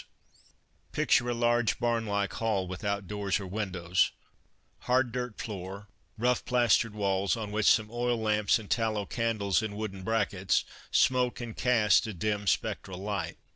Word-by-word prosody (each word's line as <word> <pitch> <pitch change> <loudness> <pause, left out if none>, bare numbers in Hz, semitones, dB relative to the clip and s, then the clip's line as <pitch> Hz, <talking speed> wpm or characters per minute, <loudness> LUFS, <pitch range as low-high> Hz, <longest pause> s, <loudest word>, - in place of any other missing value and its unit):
THE - - -22
PASTORES - - -32 0.4
Picture 120 +1 +2
a - - +1
large 120 -1 +2
barn 115 -2 0
like 100 -1 -1
hall 105 -5 -1
without 100 +2 -3
doors 105 -1 -1
or 100 - -6
windows, 90 -3 0 0.8
hard 125 -1 +3
dirt 125 -2 -4
floor, 100 -1 -6 0.3
rough 125 +2 +1
plastered 120 -3 +2
walls 100 0 +1
on 105 -2 -5
which 105 0 +1
some 110 0 +4
oil 120 0 0
lamps 105 -2 +2
and 110 -3 -10
tallow 110 -2 0
candles 110 -4 0
in 110 -2 -4
wooden 105 -3 -5
brackets 100 -2 0 0.2
smoke 125 -1 +2
and 120 -2 -6
cast 115 -6 +3
a 110 - -5
dim 105 +3 -2
spectral 95 0 -1
light. 100 +1 -4
105 Hz, 160 wpm, -29 LUFS, 100-115 Hz, 0.8 s, some